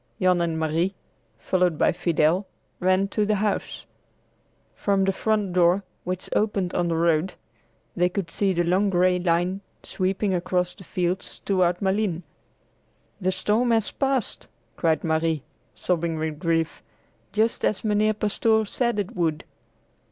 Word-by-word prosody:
Jan 180 Hz, -2 st, +3 dB
and 165 Hz, -1 st, -1 dB
Marie, 165 Hz, +5 st, 0 dB, 0.4 s
followed 180 Hz, -4 st, +1 dB
by -, -, +3 dB
Fidel, 175 Hz, +2 st, +1 dB, 0.3 s
ran 185 Hz, +2 st, +2 dB
through 210 Hz, +1 st, 0 dB
the 215 Hz, -, +2 dB
house. 205 Hz, 0 st, -2 dB, 0.9 s
From 195 Hz, -1 st, +1 dB
the 195 Hz, -, +2 dB
front 210 Hz, -1 st, 0 dB
door, 180 Hz, +2 st, +3 dB, 0.2 s
which 185 Hz, 0 st, -3 dB
opened 200 Hz, -4 st, 0 dB
on 175 Hz, -1 st, +1 dB
the 165 Hz, -, 0 dB
road; 165 Hz, +2 st, +1 dB, 0.6 s
they 180 Hz, 0 st, +2 dB
could 180 Hz, -2 st, -4 dB
see 195 Hz, +1 st, +1 dB
the 175 Hz, -1 st, +1 dB
long 185 Hz, +4 st, +2 dB
gray 180 Hz, 0 st, +3 dB
line 175 Hz, +2 st, 0 dB, 0.2 s
sweeping 190 Hz, +1 st, -1 dB
across 180 Hz, 0 st, 0 dB
the 195 Hz, -, -14 dB
fields 180 Hz, +1 st, -2 dB
toward 180 Hz, -3 st, +2 dB
Malines. 190 Hz, -3 st, 0 dB, 1.0 s
"The 185 Hz, 0 st, +1 dB
storm 210 Hz, +6 st, +1 dB
has 225 Hz, -2 st, +2 dB
passed," 270 Hz, -4 st, -1 dB, 0.3 s
cried 160 Hz, -3 st, +1 dB
Marie, 160 Hz, -2 st, 0 dB, 0.3 s
sobbing 170 Hz, -2 st, -1 dB
with 155 Hz, -1 st, -3 dB
grief, 165 Hz, -2 st, 0 dB, 0.5 s
"just 220 Hz, +3 st, 0 dB
as 210 Hz, -, 0 dB
Mynheer 215 Hz, 0 st, +2 dB
Pastoor 220 Hz, +1 st, +1 dB
said 235 Hz, +2 st, -1 dB
it 200 Hz, -3 st, -3 dB
would! 165 Hz, -4 st, 0 dB
185 Hz, 145 wpm, -25 LUFS, 170-200 Hz, 1.0 s, Jan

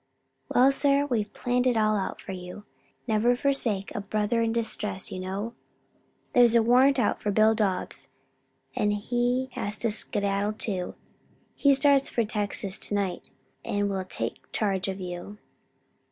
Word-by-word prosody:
"Well, 260 Hz, +2 st, +5 dB
sir, 280 Hz, +1 st, +2 dB
we've 220 Hz, -7 st, -1 dB
planned 250 Hz, +1 st, 0 dB
it 245 Hz, -2 st, +2 dB
all 215 Hz, -1 st, +3 dB
out 195 Hz, -2 st, -3 dB
for -, -, -7 dB
you 180 Hz, +2 st, -8 dB, 0.4 s
never 230 Hz, +1 st, +2 dB
forsake 245 Hz, -7 st, 0 dB
a 215 Hz, -, -3 dB
brother 215 Hz, +3 st, 0 dB
in 230 Hz, 0 st, +1 dB
distress, 210 Hz, -4 st, -3 dB
you 185 Hz, -, -5 dB
know. 195 Hz, +5 st, -4 dB, 0.8 s
There's 240 Hz, -2 st, +6 dB
a 230 Hz, -, +5 dB
warrant 255 Hz, +4 st, +5 dB
out 235 Hz, -5 st, +1 dB
for 210 Hz, -, -1 dB
Bill 215 Hz, +2 st, +4 dB
Dobbs 200 Hz, -4 st, -2 dB, 0.7 s
and 210 Hz, 0 st, +1 dB
he 245 Hz, +4 st, 0 dB
has 205 Hz, -2 st, -4 dB
to 230 Hz, 0 st, -1 dB
skedaddle 205 Hz, 0 st, -1 dB
too. 190 Hz, -4 st, -3 dB, 0.6 s
He 280 Hz, -1 st, +4 dB
starts 275 Hz, 0 st, +3 dB
for 235 Hz, -, 0 dB
Texas 205 Hz, -2 st, -2 dB
to 205 Hz, -, -1 dB
night, 195 Hz, -3 st, -2 dB, 0.3 s
and 205 Hz, -2 st, -1 dB
will 190 Hz, -1 st, -2 dB
take 185 Hz, -, -5 dB
charge 195 Hz, -3 st, 0 dB
of 190 Hz, 0 st, -4 dB
you." 180 Hz, +3 st, -7 dB
215 Hz, 155 wpm, -27 LUFS, 200-245 Hz, 0.8 s, There's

